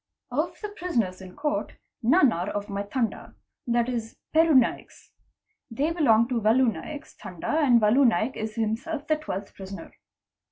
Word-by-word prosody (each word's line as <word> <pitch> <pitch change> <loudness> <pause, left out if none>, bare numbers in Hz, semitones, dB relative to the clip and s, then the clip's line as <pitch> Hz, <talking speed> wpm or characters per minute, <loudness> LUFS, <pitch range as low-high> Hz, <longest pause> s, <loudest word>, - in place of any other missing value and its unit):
Of - - -2
the 420 - -4
prisoners 240 - -2
in 185 -1 -11
court, 300 0 -2 0.3
none 265 +3 +5
are 175 +1 -2
of 205 0 -4
my 200 0 -2
Tanda, 225 +3 -3 0.3
that 240 0 +2
is 230 -3 -4 0.2
Peru 320 -1 +5
Naik's. 255 -3 +1 0.6
They 280 +7 -1
belong 235 -9 +4
to 240 -3 0
Valu 225 +2 +4
Naik's 305 0 -8
Tanda 185 - -3
and 255 -6 +5
Valu 235 +5 +5
Naik 230 +2 +1
is 220 -1 -5
himself 240 +8 -2
the 310 0 +1
12th 200 -10 -6
prisoner. 195 0 -9
235 Hz, 160 wpm, -26 LUFS, 215-295 Hz, 0.6 s, none